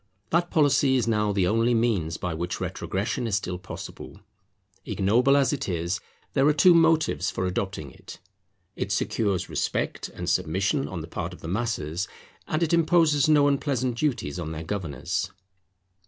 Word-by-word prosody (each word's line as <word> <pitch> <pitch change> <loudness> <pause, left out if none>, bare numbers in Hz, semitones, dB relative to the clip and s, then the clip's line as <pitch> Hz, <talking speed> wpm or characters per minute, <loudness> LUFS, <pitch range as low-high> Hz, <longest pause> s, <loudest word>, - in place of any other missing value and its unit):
That 175 +1 +2
policy 140 -4 +3
is 125 -3 +1
now 105 -2 +1
the 100 -2 +1
only 115 +5 +2
means 100 -9 0
by 90 -2 -3
which 85 +3 -3
retrogression 110 +6 -2
is 105 - 0
still 90 -2 -3
possible. 90 - -9 0.6
Ignoble 120 +10 +3
as 140 +1 +3
it 140 - -3
is, 85 +2 -1 0.3
there 135 0 +3
are 150 - +5
two 175 +4 +6
motives 160 - +3
for 95 - -2
adopting 90 -6 -3
it; - - -12 0.6
it 100 - -3
secures 100 -2 0
respect - - -2
and - - -7
submission 100 - +1
on 85 -3 -5
the 80 - -8
part 90 +1 -5
of - - -13
the - - -7
masses, 95 -4 -2 0.4
and 155 +2 0
it 165 - 0
imposes 165 -3 +4
no 145 -2 +5
unpleasant 135 -3 0
duties 120 - -1
on 80 -2 -4
their 80 +1 -5
governors. 80 -7 -3
110 Hz, 165 wpm, -26 LUFS, 90-140 Hz, 0.6 s, two